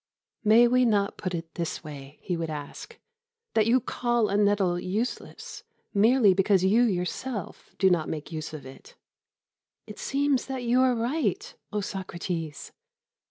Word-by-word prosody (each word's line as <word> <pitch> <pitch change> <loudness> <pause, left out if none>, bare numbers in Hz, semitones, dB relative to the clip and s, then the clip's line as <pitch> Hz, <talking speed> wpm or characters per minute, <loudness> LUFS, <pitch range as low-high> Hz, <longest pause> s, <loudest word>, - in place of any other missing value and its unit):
"May 225 +3 +6
we 250 +1 +3
not 205 -4 +2
put 185 -3 -3
it 165 - -3
in 165 - -37
this 170 -1 -4
way," 145 -2 -10
he 180 - -2
would 165 -1 -3
ask, 145 -2 -7 0.6
"that 220 -1 +3
you 245 +3 +5
call 240 -2 0
a 200 - 0
nettle 200 -4 +2
useless 210 +8 -4 0.3
merely 215 0 +5
because 195 0 +3
you 205 +5 +4
yourself 205 +1 -3
do 190 - +4
not 165 -3 +1
make 155 0 -5
use 155 -1 -5
of 155 -3 -8
it?" 130 - -13 0.9
"It - - -10
seems 280 -1 0
that 265 -2 -4
you 245 +2 +3
are 255 -1 +3
right, 315 - -1 0.2
O 210 -1 -1
Socrates." 175 -5 -5
205 Hz, 160 wpm, -27 LUFS, 175-240 Hz, 0.9 s, May